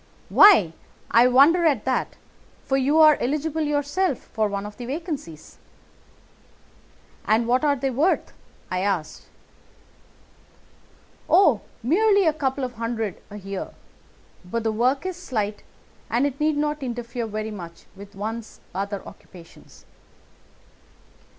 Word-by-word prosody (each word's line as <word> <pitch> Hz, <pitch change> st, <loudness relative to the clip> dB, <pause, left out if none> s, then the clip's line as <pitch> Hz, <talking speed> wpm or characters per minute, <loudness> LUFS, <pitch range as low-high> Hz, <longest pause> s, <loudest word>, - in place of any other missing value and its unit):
"'Why, 335 Hz, -, +7 dB, 0.4 s
I 235 Hz, +2 st, +6 dB
wonder 285 Hz, +8 st, +5 dB
at 275 Hz, -9 st, 0 dB
that, 260 Hz, -1 st, -1 dB, 0.5 s
for 270 Hz, -, 0 dB
you 270 Hz, +3 st, +2 dB
are 310 Hz, -1 st, +6 dB
eligible 305 Hz, +4 st, -1 dB
yourself 295 Hz, +2 st, 0 dB
for 215 Hz, -1 st, -2 dB
one 200 Hz, 0 st, -4 dB
of 210 Hz, 0 st, -9 dB
the 245 Hz, -, -7 dB
vacancies.' 275 Hz, -, -6 dB, 1.7 s
"'And 220 Hz, +2 st, +3 dB
what 250 Hz, +4 st, +2 dB
are 290 Hz, -1 st, +3 dB
they 270 Hz, 0 st, -2 dB
worth?' 295 Hz, +9 st, 0 dB, 0.4 s
I 185 Hz, -, -1 dB
asked. 185 Hz, -6 st, -3 dB, 2.0 s
"'Oh, 300 Hz, -, +5 dB, 0.2 s
merely 400 Hz, -, +3 dB
a 315 Hz, -, +3 dB
couple 275 Hz, -3 st, -2 dB
of 250 Hz, -1 st, -4 dB
hundred 230 Hz, -3 st, -3 dB
a 205 Hz, -, -9 dB
year, 195 Hz, -1 st, -6 dB, 0.7 s
but 220 Hz, +6 st, -4 dB
the 225 Hz, -, 0 dB
work 255 Hz, +8 st, 0 dB
is 370 Hz, -2 st, -4 dB
slight, 215 Hz, -, -3 dB, 0.5 s
and 245 Hz, +4 st, +1 dB
it 275 Hz, -1 st, -3 dB
need 305 Hz, -1 st, +1 dB
not 300 Hz, 0 st, -1 dB
interfere 240 Hz, -2 st, -4 dB
very 215 Hz, 0 st, -4 dB
much 170 Hz, -5 st, -10 dB
with 200 Hz, +1 st, -13 dB
one's 220 Hz, +3 st, -6 dB
other 200 Hz, +1 st, -4 dB
occupations. 170 Hz, -3 st, -16 dB
245 Hz, 130 wpm, -23 LUFS, 210-295 Hz, 2.0 s, Why